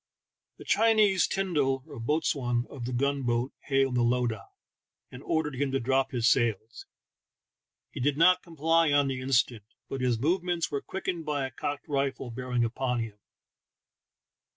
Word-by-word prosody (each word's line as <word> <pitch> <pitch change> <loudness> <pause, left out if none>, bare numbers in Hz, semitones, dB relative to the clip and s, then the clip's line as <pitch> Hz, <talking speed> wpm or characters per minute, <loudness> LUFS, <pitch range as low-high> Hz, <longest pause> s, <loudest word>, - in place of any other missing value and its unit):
The - - -11
Chinese 215 -4 +4
tyndal 145 -9 0
(boatswain) 135 -3 -1
of 125 -4 -6
the 125 - -4
gun 140 +3 0
boat 120 +1 -1
hailed 135 -2 +2
the 125 - +2
lowdah, 120 -4 0 0.6
and 125 - -10
ordered 150 -3 -1
him 140 0 0
to 135 - +2
drop 135 +2 +1
his 120 -3 0
sails; 115 -2 0 1.0
he - - -7
did 140 +2 +1
not 180 +3 +5
comply 165 -1 +1
on 145 -1 +3
the 130 -1 -3
instant, 125 -3 +1 0.3
but 135 - -4
his 125 -2 +1
movements 175 +5 0
were 140 -1 -2
quickened 180 -3 -4
by 145 -3 -1
a 130 - -6
cocked 145 +3 -5
rifle 135 -3 -2
bear 125 +2 -6
ing 120 -1 +2
upon 125 +1 -1
him. 110 -2 -7
135 Hz, 155 wpm, -28 LUFS, 120-150 Hz, 1.0 s, not